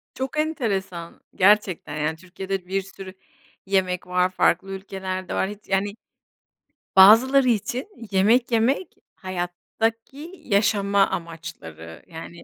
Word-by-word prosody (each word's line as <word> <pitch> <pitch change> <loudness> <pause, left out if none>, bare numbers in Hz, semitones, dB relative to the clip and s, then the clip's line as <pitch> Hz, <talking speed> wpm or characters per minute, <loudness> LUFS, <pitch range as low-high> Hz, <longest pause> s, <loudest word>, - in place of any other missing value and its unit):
Çok 265 +3 -4
enteresan. 200 - -3
Gerçekten, 190 -6 +2
yani, 155 +1 -1
Türkiye'de 185 +1 -6
bir 195 +1 -1
sürü 190 0 -11 0.5
yemek 185 -2 0
var, 180 0 +2
farklı 185 +1 +1
ülkelerde 190 -1 -5
var. 190 - 0
Hiç, 210 0 -8
yani. 200 +1 0 1.0
Bazıları 250 +7 +7
için 240 - -1 0.2
yemek 220 +6 +3
yemek, 240 +10 +2 0.3
hayattaki 225 - -4
yaşama 200 -2 +2
amaçları. 155 - -8
Yani, 170 +1 -10
195 Hz, 105 wpm, -23 LUFS, 180-220 Hz, 1.0 s, Bazıları